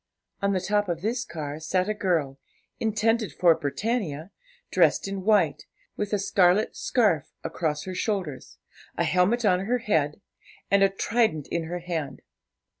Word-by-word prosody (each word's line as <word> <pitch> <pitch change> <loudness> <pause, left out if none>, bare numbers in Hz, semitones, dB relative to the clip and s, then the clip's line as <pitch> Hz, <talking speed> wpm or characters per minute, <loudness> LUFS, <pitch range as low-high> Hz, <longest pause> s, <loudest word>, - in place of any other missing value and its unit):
On 200 0 +1
the 185 - +1
top 205 +1 0
of 170 -1 -2
this 235 +4 -1
car 155 -7 -6
sat 180 +4 0
a 215 - 0
girl, 165 -9 -1 0.4
intended 220 0 +1
for 175 -2 +4
Britannia, 165 - -3 0.4
dressed - - +3
in 195 -1 -4
white, 190 -7 +2 0.3
with 210 - -3
a 205 - +2
scarlet 195 +1 +2
scarf 205 - +1 0.2
across 150 -3 -2
her 185 - -6
shoulders, 185 - -3 0.4
a - - +2
helmet 200 +6 +2
on 185 -1 +3
her 245 +4 +1
head, 160 -10 0 0.5
and 200 0 +5
a 195 - +6
trident 195 - 0
in 170 -1 -1
her 175 +2 -5
hand. 165 -4 -4
185 Hz, 155 wpm, -26 LUFS, 160-210 Hz, 0.5 s, a